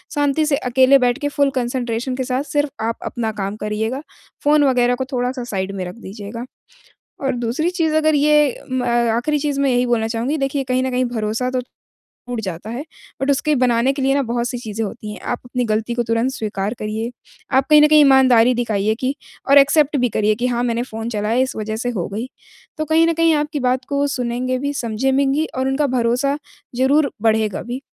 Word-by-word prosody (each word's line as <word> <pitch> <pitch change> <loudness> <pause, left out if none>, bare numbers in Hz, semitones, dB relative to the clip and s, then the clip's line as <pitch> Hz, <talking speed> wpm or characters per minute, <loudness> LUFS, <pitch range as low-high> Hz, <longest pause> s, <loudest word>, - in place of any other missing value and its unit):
शांति 290 +1 +1
से 285 -2 +1
अकेले 260 +1 +4
बैठ 245 -1 +2
के 290 - -1
फुल 280 -1 +2
कंसंट्रेशन 245 0 -2
के 260 - -2
साथ 255 +2 -1
सिर्फ़ 290 -1 -1 0.2
आप 230 - -2
अपना 225 -2 -2
काम 195 +1 -3
करिएगा, 220 +6 -2 0.4
फ़ोन 295 0 +4
वग़ैरह 245 -2 +3
को 260 - -3
थोड़ा-सा 250 0 -1
साइड 195 -4 -3
में 185 -2 -3
रख 180 - -7
दीजिएगा। 220 +2 -8 0.8
और 265 - 0
दूसरी 245 +8 -1
चीज़ 325 -4 0
अगर 310 0 +3
ये 295 -2 +3
म 255 -1 0
आखिरी 240 +4 +1
चीज़ 285 -1 -1
मैं 275 - +2
यही 245 0 +2
बोलना 225 -2 +1
चाहूँगी 240 +7 -1
देखिए, 275 0 -1
कहीं 255 0 0
न 260 - -1
कहीं 250 0 +1
भरोसा 230 +1 -2
तो 255 - 0 0.5
टूट 245 -1 -7
जाता 190 +1 -6
है, 250 +5 -4 0.4
बट 280 +1 +2
उसके 280 +2 +1
बनाने 250 +1 +2
के 275 - -4
लिए 270 +1 +2
ना 280 - +2
बहुत-सी 240 +1 -2
चीज़ें 220 -1 -4
होती 210 0 -7
हैं। - - -10
आप - - -3
अपनी 245 0 -2
गलती 220 +2 -1
को 240 - 0
तुरंत 230 +3 0
स्वीकार 210 -3 -3
करिए। 220 +3 -3 0.5
आप 270 - +3
कहीं 300 0 +8
न - - +7
कहीं 305 0 +6
ईमानदारी 260 -4 +5
दिखाइए 220 -3 0
कि 265 +2 0 0.3
और 280 - +7
एक्सेप्ट 290 +1 +4
भी 245 -1 +1
करिए 215 0 +1
कि 245 +3 -1
हाँ, 240 -1 -1
मैंने 240 0 0
फ़ोन 225 -1 -6
चलाया 215 +1 -1
इस 260 0 -1
वजह 215 0 -3
से 245 +2 -2
हो 195 -8 -3
गई। 225 +5 -3 0.5
तो 310 - -2
कहीं 320 +2 +4
न 335 - +2
कहीं 330 0 +3
आपकी 295 0 -1
बात 255 0 0
को 280 - -1
वो 285 0 +2
सुनेंगे 250 +1 -1
भी, 285 +1 -2
समझें 240 +1 -1
में 270 0 +2
घी 310 +3 +1
और 260 +1 0
उनका 280 +2 +1
भरोसा 255 +3 +1 0.4
ज़रूर 280 +3 +3
बढ़ेगा 220 -2 +1
भी, 245 +3 -5
250 Hz, 215 wpm, -20 LUFS, 230-275 Hz, 0.8 s, कहीं